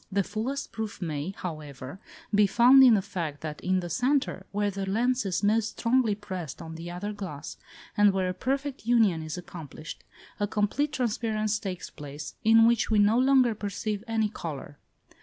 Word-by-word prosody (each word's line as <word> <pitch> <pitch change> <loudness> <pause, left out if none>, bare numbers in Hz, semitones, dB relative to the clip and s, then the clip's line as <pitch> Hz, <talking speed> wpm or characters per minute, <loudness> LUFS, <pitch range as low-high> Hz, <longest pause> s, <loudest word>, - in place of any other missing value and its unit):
The 200 0 +2
fullest 230 +9 -4
proof 220 -1 -5
may, 155 -2 -3
however, 150 -3 -7 0.3
be 205 0 +5
found 250 +6 +7
in 245 -4 +8
the 195 - +1
fact 160 -7 -4
that 155 -1 -6
in 185 0 +1
the 175 - -6
centre, 250 - 0
where 205 0 0
the 195 0 -4
lens 245 +2 +1
is 185 +2 -1
most 215 +1 +1
strongly 230 -3 +2
pressed 185 -7 -6
on 160 0 -8
the 165 +1 -7
other 180 +4 -4
glass, 180 -8 -7 0.4
and 205 -1 +5
where 190 -1 0
a 185 - -1
perfect 270 +4 -3
union 220 -9 +3
is 155 +1 -5
accomplished, 160 -3 -9 0.4
a 205 - +1
complete 215 +9 0
transparence 215 -3 -1
takes 185 -4 -6
place, 145 0 -8
in 225 +1 +6
which 235 -1 +2
we 220 - +3
no 210 +3 +4
longer 260 -2 +4
perceive 205 0 -4
any 220 -2 +1
colour. 150 -7 -7
205 Hz, 175 wpm, -27 LUFS, 175-225 Hz, 0.4 s, in